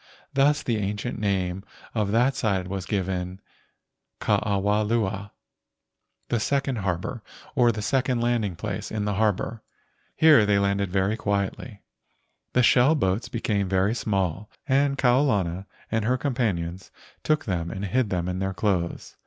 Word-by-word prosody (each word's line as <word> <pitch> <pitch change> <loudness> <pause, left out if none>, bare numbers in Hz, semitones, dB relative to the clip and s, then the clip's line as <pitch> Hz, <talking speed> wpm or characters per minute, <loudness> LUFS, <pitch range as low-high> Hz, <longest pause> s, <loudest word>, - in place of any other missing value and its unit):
Thus 145 +2 +3
the 115 -3 0
ancient 105 +3 -3
name 95 -2 -1 0.3
of 105 -3 0
that 120 +5 +3
side 95 -5 0
was 95 0 -4
given 95 -2 -2 0.8
Ke - - -6
awa 105 +1 +2
lua 105 -2 -1 1.0
(the 120 - +1
second 135 +2 0
harbor, 95 +4 -3 0.3
or 120 -4 +4
the 105 -2 -5
second 130 0 +1
landing 115 -6 0
place 100 +2 -4
in 105 -1 -2
the 105 - 0
harbor). 110 +2 0 0.5
Here 155 -7 +7
they 105 -1 +3
landed 100 -1 +1
very 95 +3 +1
quietly. 100 +2 -3 0.7
The 125 - +4
shell 125 +6 +5
boats 95 -5 0
be¬ 115 - -5
came 100 -3 0
very 95 +3 +2
small 100 -3 -1 0.2
and 140 0 +2
Kau 125 0 +4
lana 95 -8 0 0.2
and 115 -1 +1
her 125 +4 +1
com¬ 140 +1 -2
panions 95 -7 -2 0.3
took 155 -1 +1
them 85 -4 -2
and 95 +4 -4
hid 120 +2 +1
them 90 -2 -1
in 90 0 -2
their 95 0 -2
clothes. 90 -3 -2
105 Hz, 155 wpm, -25 LUFS, 95-120 Hz, 1.0 s, Here